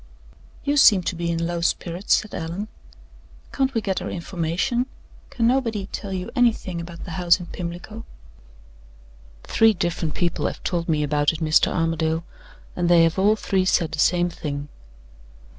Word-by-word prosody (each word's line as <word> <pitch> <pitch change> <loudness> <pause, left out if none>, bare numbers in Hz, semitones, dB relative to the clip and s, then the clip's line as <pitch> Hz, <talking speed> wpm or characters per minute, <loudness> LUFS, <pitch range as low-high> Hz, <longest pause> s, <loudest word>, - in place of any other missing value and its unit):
"You 290 0 0
seem 205 -9 +7
to 175 - -2
be 170 0 -2
in 170 0 -1
low 170 0 -2
spirits," 175 +2 +1
said 215 - -6
Allan. 170 +6 -4 0.8
"Can't 265 -1 +1
we 225 - +1
get 195 -3 -2
our - - -4
information? 180 +8 -1 0.4
Can 235 - -1
nobody 230 -5 +1
tell 200 - -5
you 185 -1 -4
anything 225 -8 +1
about 170 0 -9
the 175 - -7
house 175 +1 +4
in 175 - -7
Pimlico?" 175 +6 -7 1.4
"Three 225 0 +4
different 170 -4 -2
people 175 -1 0
have - - -6
told 170 -2 -2
me 150 -2 +2
about 145 +1 +1
it, 160 - -6
Mr. 155 -1 +3
Armadale, 165 -1 0 0.5
and 175 -1 0
they 170 -1 +6
have 165 +3 +1
all 205 +3 +4
three 195 -3 0
said 170 -3 +1
the - - -5
same 175 +2 +3
thing." 145 -2 -5
175 Hz, 165 wpm, -23 LUFS, 165-205 Hz, 1.4 s, seem